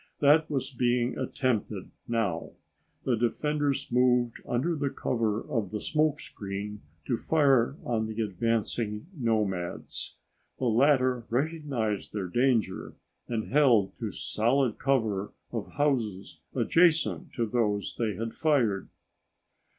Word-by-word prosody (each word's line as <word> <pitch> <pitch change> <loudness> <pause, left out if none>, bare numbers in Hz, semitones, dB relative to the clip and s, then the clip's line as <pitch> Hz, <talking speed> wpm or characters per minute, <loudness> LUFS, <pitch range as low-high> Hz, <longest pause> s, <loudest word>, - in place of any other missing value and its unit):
That 150 +2 +5
was 135 -2 -2
being 120 0 +1
attempted 120 -6 -2 0.2
now. 100 -8 -1 0.5
The 125 - +2
defenders 140 +4 0
moved 125 -1 +3
under 140 +8 0
the 145 -2 -1
cover 110 -5 -1
of 115 -9 -1
the 105 - -3
smokescreen 105 -9 -2 0.3
to 120 - 0
fire 140 -5 +3
on 110 -2 0
the 110 0 -5
advancing 110 +1 -1
nomads. 105 - -2 0.4
The 130 - -2
latter 130 0 +3
recognized 135 -6 -1
their 95 -4 -3
danger 120 -3 +1 0.3
and 115 -2 -3
held 120 -10 +4
to 110 -3 -3
solid 120 +5 0
cover 110 -7 0 0.2
of 115 -4 -5
houses 120 -10 -1 0.2
adjacent 170 -1 +3
to 120 - 0
those 105 -3 0
they 110 -4 0
had 115 +3 -4
fired. 125 -11 +1
120 Hz, 115 wpm, -28 LUFS, 105-140 Hz, 0.5 s, That